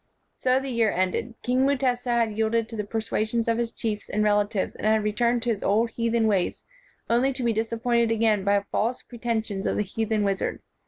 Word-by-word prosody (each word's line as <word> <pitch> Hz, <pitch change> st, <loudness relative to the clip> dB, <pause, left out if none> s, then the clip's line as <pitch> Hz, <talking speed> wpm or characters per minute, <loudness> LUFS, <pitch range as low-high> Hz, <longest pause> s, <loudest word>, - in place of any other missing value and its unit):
So 255 Hz, 0 st, +2 dB
the 270 Hz, 0 st, -5 dB
year 230 Hz, -2 st, +2 dB
ended. 185 Hz, +6 st, -1 dB
King 250 Hz, +2 st, +2 dB
Mutesa 255 Hz, -3 st, 0 dB
had 235 Hz, -2 st, +2 dB
yielded 220 Hz, +1 st, +1 dB
to 230 Hz, -, -7 dB
the 210 Hz, -, -2 dB
persuasions 225 Hz, +1 st, -1 dB
of 230 Hz, 0 st, +1 dB
his 235 Hz, -1 st, -1 dB
chiefs 210 Hz, -2 st, -4 dB
and 210 Hz, -, 0 dB
relatives 205 Hz, -1 st, +1 dB
and -, -, -3 dB
had 220 Hz, 0 st, +3 dB
returned 235 Hz, +3 st, +1 dB
to 240 Hz, -, +1 dB
his 210 Hz, -, -3 dB
old 225 Hz, +3 st, +2 dB
heathen 230 Hz, 0 st, 0 dB
ways 200 Hz, -5 st, 0 dB, 0.4 s
only 245 Hz, +4 st, +2 dB
to 260 Hz, -, -4 dB
be 235 Hz, -1 st, +2 dB
disappointed 230 Hz, +1 st, +1 dB
again 220 Hz, -3 st, +2 dB
by 200 Hz, +1 st, +3 dB
the 200 Hz, -, -3 dB
false 235 Hz, +4 st, -1 dB
pretensions 225 Hz, -4 st, -3 dB
of -, -, 0 dB
the -, -, +1 dB
heathen 215 Hz, +1 st, -1 dB
wizard. 195 Hz, -1 st, -1 dB
225 Hz, 205 wpm, -25 LUFS, 210-235 Hz, 0.4 s, had